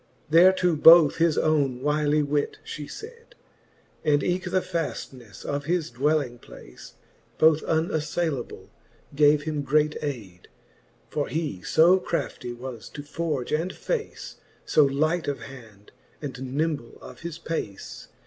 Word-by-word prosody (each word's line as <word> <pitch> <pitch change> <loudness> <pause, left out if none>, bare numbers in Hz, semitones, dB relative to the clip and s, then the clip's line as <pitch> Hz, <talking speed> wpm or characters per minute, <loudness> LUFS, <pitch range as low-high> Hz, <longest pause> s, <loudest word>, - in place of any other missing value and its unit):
Thereto 180 +1 +5
both 160 0 +7
his 165 -2 +2
owne 145 -5 +1
wylie 150 0 +2
wit, 145 0 -1
fhe 150 - -6
fayd, 465 - -11 0.7
And 145 -2 +2
eke 180 +1 -1
the 185 +1 +2
faftnefle 135 - -6
of 145 0 -3
his 170 -4 -1
dwelling 135 -1 0
place, - - -14 0.4
Both 155 -1 +5
unafTaylable, 160 -3 -2 0.4
gave 145 0 +4
him 155 -1 -2
great 150 +2 +1
ayde: 110 -12 -6 0.6
For 145 -2 -1
he 150 - -3
fo 170 - +4
crafty 170 -8 -4
was 120 -1 -8
to 145 - -6
forge 150 -3 -3
and 165 +4 0
face, 460 -3 -5 0.3
So 155 - +4
light 155 +5 0
of 140 -1 -3
hand, 110 -7 -13 0.3
and 130 -3 -6
nymble 150 -6 -2
of - - -12
his 170 -1 -6
pace. 160 - -6
150 Hz, 130 wpm, -25 LUFS, 135-165 Hz, 0.7 s, both